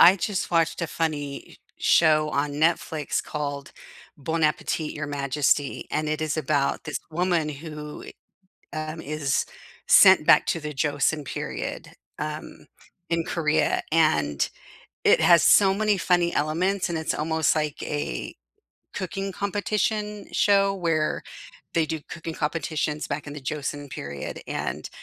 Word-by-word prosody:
I 185 +3 +9
just 190 +2 -2
watched 165 -1 +2
a - - 0
funny 150 -4 -3
s - - -15 0.2
show 155 -2 +4
on 145 0 0
Netflix 155 -1 0
called 145 -2 -4 0.5
Bon 160 +3 -2
Appetit, 150 0 0
Your 150 -1 -4
Majesty, 140 0 0
and 155 0 -1
it 155 0 -1
is 155 -1 -1
about 145 -1 0
this 150 - -3
woman 175 -1 +1
who 150 0 -7 0.7
i 155 -1 -3
um, 165 - -8
is 145 -1 -1 0.4
sent - - +7
back - - +6
to 165 - 0
the 150 0 -5
Joseon 145 +1 0
period, - - -5 0.3
um, - - -6 0.4
in 165 -1 +1
Korea. 155 -3 +1
And 75 - +2 0.6
It - - +5
has 170 -1 +6
so 195 -2 +6
many 210 0 +1
funny 175 -2 +2
elements 175 +6 0
and 165 - -1
it's 160 - -1
almost 160 +1 +1
like 150 -2 -2
a 145 - -4 0.6
cooking 195 +2 -4
competition 210 +1 -1
show 200 -1 +3
where 165 -4 0 0.5
they 165 -2 +2
do 160 -1 -3
cooking 165 -1 -6
competitions 155 -1 -2
back 150 - -4
in 145 - -6
the 150 - -7
Joseon 145 0 -4
period. 70 - -6
And - - -4
155 Hz, 140 wpm, -25 LUFS, 150-170 Hz, 0.7 s, I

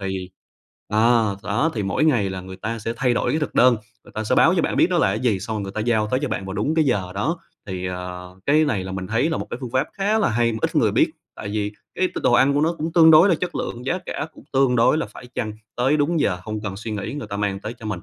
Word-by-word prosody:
Thì 95 -1 -4 0.6
ờ, 110 -1 +3
đó 140 +11 0
thì 105 -3 -2
mỗi 100 +10 0
ngày 115 -10 +2
là 95 -1 -5
người 95 +1 -9
ta 115 +4 -4
sẽ 115 +2 -3
thay 125 -2 +2
đổi - - 0
cái 155 - 0
thực 150 - -4
đơn, 125 -2 +5 0.3
người - - -16
ta 110 - -3
sẽ - - +1
báo - - +5
cho - - +2
bạn - - -1
biết - - +5
đó - - +1
là - - +4
cái 100 +3 -1
gì, 115 -6 +1
xong 110 +3 -4
rồi 105 - -2
người 95 - -5
ta 110 - -5
giao 110 -2 +1
tới 130 - +2
cho 145 - 0
bạn 100 -4 -3
vào 95 - -5
đúng 110 +11 -1
cái 160 -2 +3
giờ 95 -8 0
đó. 150 - -1 0.3
Thì, 95 -2 -4
ờ, 90 0 -7
cái 155 +2 +4
này 105 -10 -1
là 95 - -6
mình 95 -1 -4
thấy 115 +8 +1
là 165 - -1
một - - -5
cái - - -4
phương 125 - -5
pháp 130 +2 +1
khá 205 +2 +1
là 210 - +2
hay 115 +1 +2
mà 110 - -3
ít - - -1
người - - +3
biết, - - +3 0.2
tại 100 - -6
vì 105 -1 -2 0.2
cái 185 - +2
t - - -2
đồ - - +4
ăn 135 +3 +5
của 145 - +2
nó 165 +2 +2
cũng 160 +2 -3
tương 160 -1 +7
đối 160 +6 +7
là 170 - +4
chất 180 - -4
lượng, 120 +2 -4
giá 175 +6 0
cả - - -4
cũng - - -15
tương 135 -2 +3
đối 120 +6 +4
là - - -1
phải 125 - -12
chăng, 110 -2 -2 0.2
tới 130 +5 +2
đúng 155 +3 +1
giờ 90 -10 +1
hông 110 -1 -4
cần 100 -3 -4
suy 110 +2 -6
nghĩ 105 +3 -4
người 145 -7 -6
ta 100 0 -5
mang 100 -1 -1
tới 110 +3 -6
cho 110 - -10
mình. 105 -5 -3
115 Hz, 310 wpm, -22 LUFS, 100-145 Hz, 0.6 s, tương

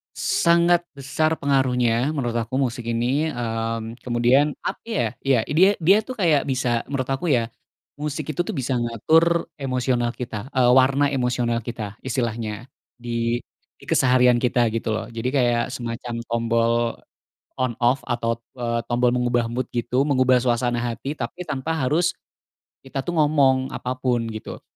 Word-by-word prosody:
Sangat 170 +1 +3
besar 150 +4 0
pengaruhnya 125 -3 +1
menurut 120 -4 -1 0.2
aku 130 - -5
musik 125 -3 -1
ini, 125 +7 0
mmm, 115 -3 -3
kemudian 125 +5 +2
apa - - -3
ya, 225 - 0
ya 130 -5 +2
dia 185 +7 +4
dia 195 +6 +6
tuh 255 - -5
kayak 160 -9 +2
bisa- 125 -3 0
menurut 140 -1 -1
aku 135 +6 -2
ya- 120 -5 +1 0.5
musik 150 0 -3
itu 145 - -11
tuh - - -3
bisa 130 -2 -1
ngatur 160 +9 +2
emosional 125 -2 -1
kita, 115 -2 -6
eee, 125 -1 +5
warna 135 +2 +4
emosional 125 -3 0
kita 110 -2 -6
istilahnya, 120 -1 -3 0.2
di 120 0 -2 0.3
di - - -21
keseharian 125 -2 +4
kita 120 -2 +2
gitu 110 -1 -1
loh, 110 +1 -5
jadi 115 +2 -3
kayak 120 -2 +2
semacam 120 -2 -5 0.2
tombol 115 0 +1 0.8
on-off 125 +1 0
atau, 115 -1 -1 0.2
eee, 120 -2 -2
tombol 125 +1 +1
mengubah 120 -1 +1
mood 125 +2 -2
gitu, 125 +3 0
mengubah 130 -3 +3
suasana 120 0 +1 0.2
hati, 135 +6 -5
tapi 130 +8 -5
tanpa 145 +2 -2 0.2
harus 170 +3 +2 0.7
kita 135 0 -4
tuh 175 +4 -4
ngomong 140 -4 +3
apa 125 +1 -4
pun 120 -3 0
gitu. 110 -1 -7
125 Hz, 150 wpm, -23 LUFS, 120-140 Hz, 0.8 s, dia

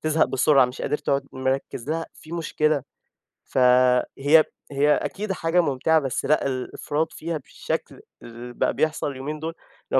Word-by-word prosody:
تزهق 155 0 +3
بسرعة، 135 +1 +4
مش 125 +1 -8
قادر 150 +2 -1
تقعد 140 0 -1
مركّز 130 0 -2
لها، 165 +1 -2
في 160 - -13
مشكلة. 155 -3 0 0.6
فهي 130 +4 +4 0.3
هي 145 +2 +4
أكيد 205 0 -3
حاجة 175 -1 +1
ممتعة، 160 +1 +2
بس 135 -4 -3
لأ 155 - +2
الإفراط 145 +4 -2
فيها 165 0 -4
بالشكل 140 - -5 0.2
اللي 120 +1 -9
بقى - - 0
بيحصل 155 -2 0
اليومين 140 +4 -5
دول، 160 +1 -3 0.4
اللي - - +4
145 Hz, 150 wpm, -24 LUFS, 130-160 Hz, 0.6 s, بسرعة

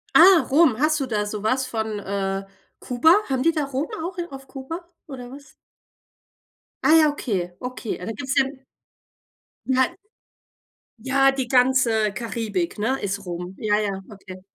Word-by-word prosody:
Ah, 355 0 +8
Rum, 280 -5 +4
hast 310 0 +2
du 270 - -1
da 210 -4 -1
so 210 0 -5
was 255 +4 +1
von, 220 -3 -3
äh, 195 0 -3 0.3
Kuba? 260 +7 +4 0.2
Haben 260 0 0
die 330 - +4
da 305 -3 -1
Rum 275 +2 -3 0.2
auch 360 +1 -5
i 345 - -2
auf 270 -1 -10
Kuba, 310 +6 -7 0.2
oder 250 -3 -9
was? 280 +1 -13 1.3
Ah 315 - +6
ja, 310 -2 +6
okay, 185 -11 -3
okay. 250 -3 -5
Ja, 180 - -8
da 225 - -3
gibt's 270 +1 -4
ja 270 - +5 1.2
Nei 260 +3 +1 1.0
Ja, 270 +3 +3
die 265 -2 -3
ganze 245 -4 +3
Karibik, 210 -4 -3
ne, 260 +5 0
ist 200 0 -3
Rum. 180 +1 -6
Ja, 210 -1 +1
ja, 195 -2 -2
okay. 190 -2 -11
250 Hz, 160 wpm, -23 LUFS, 205-275 Hz, 1.3 s, Ah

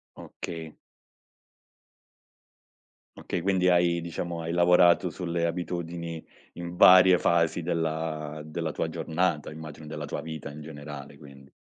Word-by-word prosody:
Okay. 80 -2 -8 2.4
Okay, 90 - -3
quindi 95 0 +2
hai 85 -1 +3
diciamo, 85 0 -5
hai 80 0 -4
lavorato 90 +1 +5
sulle 85 0 -2
abitudini 85 -1 -4 0.3
in 85 0 -7
varie 90 0 +8
fasi 85 0 +1
della 80 -2 -2
della 80 +1 -3
tua 80 - -2
giornata, 80 -1 -1
immagino 75 0 -9
della 75 -1 -5
tua 75 - -4
vita 80 -3 -7
in 75 +2 -10
generale 70 -2 -9
quindi? 70 -2 -15
85 Hz, 120 wpm, -27 LUFS, 75-85 Hz, 2.4 s, varie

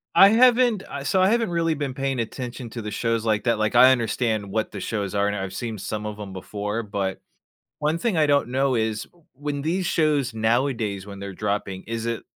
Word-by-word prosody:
I 195 - +9
haven't, 240 -2 +4
I 140 - -5
so 185 +7 +2
I 190 - +5
haven't 230 -2 +2
really 165 -1 +1
been 145 -3 -3
paying 135 -2 -1
attention 120 +1 -5
to 115 - -5
the 105 - -5
shows 115 0 -1
like 105 -2 +1
that, 115 -2 +2
like 110 0 0
I 130 +1 +8
understand 110 -4 0
what 110 +1 -1
the 100 - -6
shows 100 0 -3
are, 100 0 +2
and 105 - -1
I've 95 -1 -4
seen 110 -1 -4
some 105 +2 -4
of 105 0 -5
'em 100 -2 -7
before, 105 +4 -4
but 100 -2 -3 0.6
one 150 +2 +1
thing 220 +2 0
I 155 -2 +3
don't 140 -4 +2
know 135 0 +1
is, 110 -1 -1 0.3
when 145 +1 -4
these 180 +4 0
shows 150 -6 +1
nowadays, 110 -3 0
when 100 -1 -8
they're 100 0 -6
dropping, 100 -1 -3
is 115 0 -4
it 115 -1 -2
115 Hz, 220 wpm, -24 LUFS, 105-145 Hz, 0.6 s, I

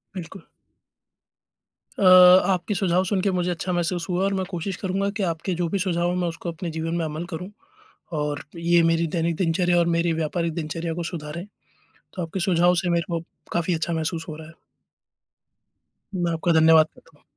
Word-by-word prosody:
बिल्कुल। 180 +1 -9 1.5
अ, - - -2 0.5
आपके 185 +3 -2
सुझाव 185 -1 +2
सुनके 190 +1 0
मुझे 180 -1 -1
अच्छा 175 +1 -3
महसूस 175 0 -1
हुआ 180 +2 0
और 195 0 +1
मैं 190 -1 -1
कोशिश 180 +1 -4
करूँगा 195 +1 -1
कि 205 - -1
आपके 170 +2 -2
जो 170 - +1
भी 200 - -1
सुझाव 175 -2 0
हों 180 - -1
मैं 180 -1 0
उसको 170 +1 -5
अपने 170 +1 -6
जीवन 165 +1 -3
में 170 - -1
अमल 155 +2 -4
करूँ 180 +4 -5 0.7
और 150 -1 -2
ये 170 +1 +3
मेरी 165 0 +1
दैनिक 165 0 0
दिनचर्या 175 0 +2
और 170 - +2
मेरी 170 0 +1
व्यापारिक 165 +1 -2
दिनचर्या 165 +1 -3
को 175 - -3
सुधारें। 160 +2 -6 0.7
तो 180 - -3
आपके 170 +3 -4
सुझाव 175 -1 +3
से 180 - -1
मेरे 170 -1 +1
को 165 - -2 0.3
काफ़ी 170 +1 0
अच्छा 165 +1 -2
महसूस 160 +1 -2
हो 155 - -6
रहा 155 0 -10
है। - - -13 1.6
मैं 175 -2 0
आपका 165 +1 0
धन्यवाद 160 0 +6
करता 165 -3 -22
हूँ। - - -31
170 Hz, 185 wpm, -24 LUFS, 165-180 Hz, 1.6 s, धन्यवाद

